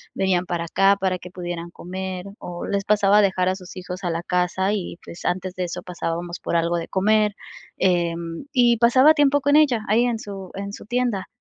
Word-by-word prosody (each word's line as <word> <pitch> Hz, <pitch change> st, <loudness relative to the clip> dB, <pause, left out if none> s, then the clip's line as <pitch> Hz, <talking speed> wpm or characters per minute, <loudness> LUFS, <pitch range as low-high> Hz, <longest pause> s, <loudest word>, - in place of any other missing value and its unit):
venían 185 Hz, -2 st, +1 dB
para 170 Hz, -1 st, -2 dB
acá 195 Hz, +4 st, +3 dB
para 185 Hz, -1 st, 0 dB
que 180 Hz, 0 st, -11 dB
pudieran 175 Hz, -1 st, -6 dB
comer. 185 Hz, +1 st, -6 dB
O 175 Hz, -1 st, -6 dB
les 200 Hz, -1 st, -1 dB
pasaba 205 Hz, -1 st, +4 dB
a -, -, +6 dB
dejar 185 Hz, -1 st, +2 dB
a 185 Hz, -, 0 dB
sus 180 Hz, -1 st, -11 dB
hijos 180 Hz, +1 st, -7 dB
a 175 Hz, -, 0 dB
la 165 Hz, -, -2 dB
casa, 180 Hz, +2 st, 0 dB
y 185 Hz, -4 st, -4 dB
pues, 170 Hz, -, -10 dB
antes 185 Hz, +1 st, -2 dB
de 185 Hz, -, -2 dB
eso, 175 Hz, -, -5 dB
pasábamos 175 Hz, 0 st, -4 dB
por -, -, -3 dB
algo 170 Hz, +1 st, +1 dB
de 170 Hz, -, -4 dB
comer. 210 Hz, +1 st, +2 dB, 0.4 s
Em, 170 Hz, 0 st, 0 dB
y 240 Hz, -2 st, +4 dB
pasaba 255 Hz, +6 st, +6 dB
tiempo 285 Hz, -1 st, +3 dB
con 285 Hz, +1 st, +3 dB
ella, 270 Hz, -8 st, +4 dB
ahí 230 Hz, +4 st, +4 dB
en 235 Hz, -2 st, -1 dB
su 195 Hz, -3 st, -8 dB
en 200 Hz, +1 st, -5 dB
su -, -, -9 dB
tienda. 240 Hz, -4 st, -1 dB
190 Hz, 210 wpm, -23 LUFS, 175-210 Hz, 0.4 s, a